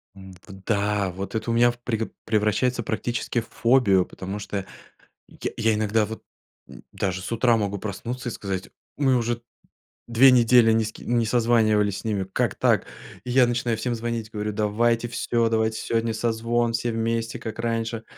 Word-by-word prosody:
М, 95 -1 -12
вот 95 -1 -12
да. 100 -2 0
Вот 95 +3 -6
это 110 +1 -1
у - - +1
меня 120 +1 +5
в 120 - -15
преп 115 -2 -3
превращается 110 +3 +1
практически 120 +2 -2
в 115 - -14
фобию. 115 -7 +3
Потому 95 +2 -6
что 100 -2 -4 0.6
я - - -5
я 115 -1 +2
иногда 105 0 +1
вот, 110 +1 -8 0.5
м, 65 -3 -13
даже 95 -1 -2
с 100 - -6
утра 115 0 +3
могу 100 -2 -2
проснуться 120 +6 -5
и - - -3
сказать: 95 -3 -5 0.3
"Мы 135 -3 +3
уже 120 0 -1 0.7
2 120 +3 +6
недели 120 -2 +5
ни 110 0 +3
с 110 - -4
ке - - -13
ни 120 -1 +1
созванивались 110 -4 +2
с - - -11
ними. 105 -3 -1
Как - - 0
так?". - - +2 0.4
И 125 - -4
я 125 0 +5
начинаю 120 -1 -1
всем 120 +1 -2
звонить, 115 -1 -4
говорю: 105 0 -3
"Давайте 115 +3 +1
всё, 115 0 0
давайте 110 0 0
сегодня 115 0 -1
созвон 115 +1 0
все 115 +1 -1
вместе, 115 +1 -2
как 110 -1 -7
раньше." 115 -1 -2
115 Hz, 180 wpm, -24 LUFS, 105-120 Hz, 0.7 s, 2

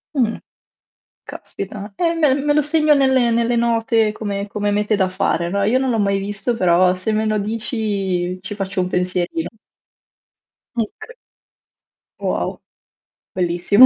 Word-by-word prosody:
Mh. 235 -4 +1 0.9
Caspita. 200 +1 -7
Eh, 335 -1 +2
me 310 -5 +3
me 290 +1 +1
lo 300 - +4
segno 305 0 +3
nelle 265 -3 +3
nelle 235 +1 +2
note 230 -2 +2
come 205 -2 -4
come 205 0 -1
mete 210 +1 +1
da 190 -2 +1
fare, 175 -2 0
no, 200 +2 0
io 230 +6 +3
non 265 0 0
l'ho 235 - +1
mai 200 -1 +2
visto 205 +4 -2
però 180 -2 +4
se 185 +4 -2
me 215 +1 +1
lo 215 0 +1
dici 200 -4 -2
ci 190 +2 -6
faccio 195 -2 -2
un 180 - 0
pensierino. 180 - -1 1.3
Muc 230 - -4 1.1
Wow. - - -2 0.7
bellissimo. 180 +6 +5
210 Hz, 145 wpm, -20 LUFS, 190-235 Hz, 1.3 s, bellissimo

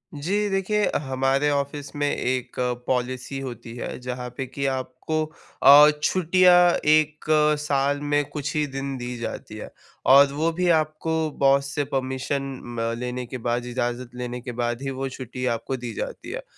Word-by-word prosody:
जी, 200 +8 -1
देखिए 195 +2 0
अ, - - 0
हमारे 135 +1 +1
ऑफ़िस 145 +1 -3
में 145 0 0
एक 125 -1 -2 0.3
पॉलिसी 130 +1 -2
होती 120 -3 -7
है 120 - -5
जहाँ 125 0 -5
पे 135 - -2
कि 140 +2 -4
आपको 135 +4 -2 0.4
अ, 145 +2 +10
छुट्टियाँ 180 0 +5 0.3
1 155 0 +3 0.3
साल 145 -1 0
में 145 0 +1
कुछ 145 0 -4
ही 150 -1 +2
दिन 135 0 -3
दी 125 0 -5
जाती 115 - -6
है - - -8 0.4
और 140 0 +7
वो 160 +3 +1
भी 180 - +2
आपको 155 +1 -3 0.2
बॉस 140 0 +3
से 145 - +1
परमिशन 130 +1 -1 0.2
म 115 -1 -2
लेने 125 0 -4
के 130 +2 -6
बाद, 120 +1 -2
इजाज़त 120 0 -3
लेने 125 0 -5
के 125 0 -6
बाद 120 +1 -1
ही 135 - -3
वो 135 0 -3
छुट्टी 125 -1 -6
आपको 130 +3 -4
दी 120 -2 -6
जाती - - -6
है। - - -5
135 Hz, 170 wpm, -24 LUFS, 125-145 Hz, 0.4 s, अ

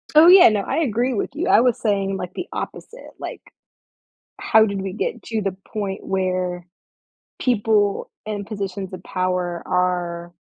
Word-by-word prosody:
Oh, 320 +2 +9
yeah, 365 -6 +9
no, 210 -2 0
I - - -3
agree 250 -2 0
with 205 - -2
you. 355 +4 -2
I - - +6
was 245 -2 +2
saying, 195 -3 0
like, 180 0 -6
the 360 - -5
opposite, 485 - -7
like - - -7 1.0
How 220 0 +5
did 200 -2 -3
we 190 -1 -4
get 470 - -3
to 225 -2 -2
the 195 -2 -2 0.2
point 200 -3 -4
where 185 -2 -1 0.8
people 210 -4 +1 0.2
in 205 -2 -4
positions 195 -2 -5
of 185 -1 -8
power 180 -2 -2
are 175 -1 -1
200 Hz, 160 wpm, -22 LUFS, 185-225 Hz, 1.0 s, Oh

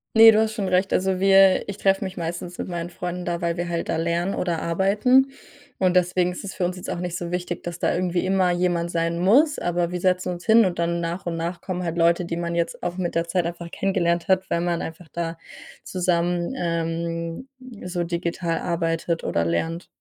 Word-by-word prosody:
Ne, 225 0 +10
du 215 - +3
hast 220 0 +1
schon 200 -3 -2
recht, 185 +2 +2
also 190 0 +1
wir 195 0 +5
ich 200 - -5
treffe 195 -1 +2
mich 190 -1 -6
meistens 175 +1 -5
mit - - -4
meinen 175 -1 -4
Freunden 180 0 -5
da, 170 0 -2
weil 170 0 -1
wir 175 0 -2
halt 170 -1 -3
da - - 0
lernen 170 +3 0
oder 170 -3 -1
arbeiten 210 +10 +3 0.5
und 185 -1 +2
deswegen 180 0 +2
ist 180 - -7
es 200 - -6
für 180 - 0
uns 180 +1 -2
jetzt 180 - -7
auch - - -2
nicht 175 -1 -3
so 175 - -5
wichtig, 180 -1 -3
dass 175 -1 -5
da - - +1
irgendwie 180 0 0
immer 185 -1 +2
jemand 175 -1 0
sein 170 0 -1
muss. 275 - +4
Aber 175 0 -1
wir 180 - -3
setzen 180 0 +1
uns 175 0 -9
hin 225 0 +6
und 175 -2 -2
dann 170 0 0
nach 170 +2 -4
und 165 -1 -2
nach 170 +1 -4
kommen 180 -2 -4
halt 170 0 -3
Leute, 170 +1 +3
die 170 - -3
man 170 0 -2
jetzt 170 0 -2
auch 175 +1 -3
mit 175 -2 -2
der 165 0 0
Zeit 175 0 0
einfach 170 0 -5
kennengelernt 170 -2 0
hat, 190 0 +2
weil 170 - +1
man 175 -1 -1
einfach 165 +1 -7
da 165 -1 -3 0.5
zusammen, 175 -1 0
ähm, 165 +3 -3 0.4
so 175 -1 -2
digital 170 0 -2
arbeitet 165 -1 -1
oder 85 0 0
lernt. 165 - -2
175 Hz, 220 wpm, -24 LUFS, 170-185 Hz, 0.5 s, Ne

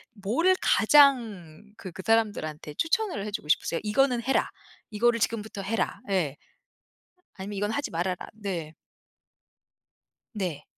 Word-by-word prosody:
뭐를 270 - +2
가장 220 - +3
그 185 - -8
그 190 - -7
사람들한테 205 -10 0
추천을 335 - 0
해 210 - -5
주고 200 - -5
싶으세요? 165 - +1
'이거는 245 +3 +2
해라. 270 - +1 0.4
이거를 230 +2 +2
지금부터 215 -3 -2
해라.' 215 +1 -2
예. 170 -8 0 1.0
아니면 200 +2 -6
'이건 205 +1 -1
하지 285 +5 -2
말아라.' 180 +2 -1 0.2
네. 180 -7 -5 1.6
네. 180 -9 -4
210 Hz, 265 characters per minute, -27 LUFS, 180-235 Hz, 1.6 s, 가장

